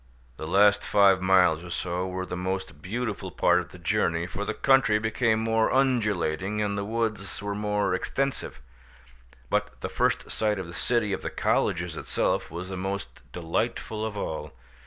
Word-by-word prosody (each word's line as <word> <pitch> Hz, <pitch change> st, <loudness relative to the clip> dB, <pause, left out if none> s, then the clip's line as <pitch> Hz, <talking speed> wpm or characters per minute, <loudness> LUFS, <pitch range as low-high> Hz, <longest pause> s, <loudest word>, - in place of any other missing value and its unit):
The 80 Hz, -, -6 dB
last 100 Hz, +3 st, +4 dB
five 100 Hz, -2 st, +4 dB
miles 90 Hz, -4 st, +4 dB
or 90 Hz, -, -9 dB
so 90 Hz, +1 st, -2 dB
were 95 Hz, 0 st, -3 dB
the 90 Hz, -, -5 dB
most 95 Hz, +1 st, -4 dB
beautiful 105 Hz, -1 st, -3 dB
part 90 Hz, 0 st, +3 dB
of 90 Hz, 0 st, -6 dB
the 90 Hz, -, -12 dB
journey, 85 Hz, -1 st, 0 dB
for 95 Hz, +3 st, -4 dB
the 110 Hz, -, -3 dB
country 135 Hz, -5 st, +4 dB
became 110 Hz, +1 st, +1 dB
more 110 Hz, 0 st, +2 dB
undulating, 105 Hz, -7 st, +1 dB
and 105 Hz, -1 st, 0 dB
the 100 Hz, -, -2 dB
woods 110 Hz, -2 st, -2 dB
were 100 Hz, 0 st, -3 dB
more 105 Hz, 0 st, 0 dB
extensive; 135 Hz, -, -2 dB, 0.9 s
but -, -, -1 dB
the -, -, -3 dB
first -, -, 0 dB
sight 105 Hz, -1 st, 0 dB
of 95 Hz, -, -4 dB
the 85 Hz, -, -10 dB
city 110 Hz, +2 st, 0 dB
of -, -, -3 dB
the -, -, -3 dB
colleges -, -, 0 dB
itself -, -, -1 dB
was 85 Hz, +3 st, -6 dB
the 95 Hz, -, -5 dB
most 95 Hz, +2 st, -4 dB
delightful 105 Hz, +5 st, -2 dB
of 110 Hz, -2 st, -3 dB
all. 75 Hz, -5 st, -4 dB
100 Hz, 175 wpm, -27 LUFS, 90-110 Hz, 0.9 s, last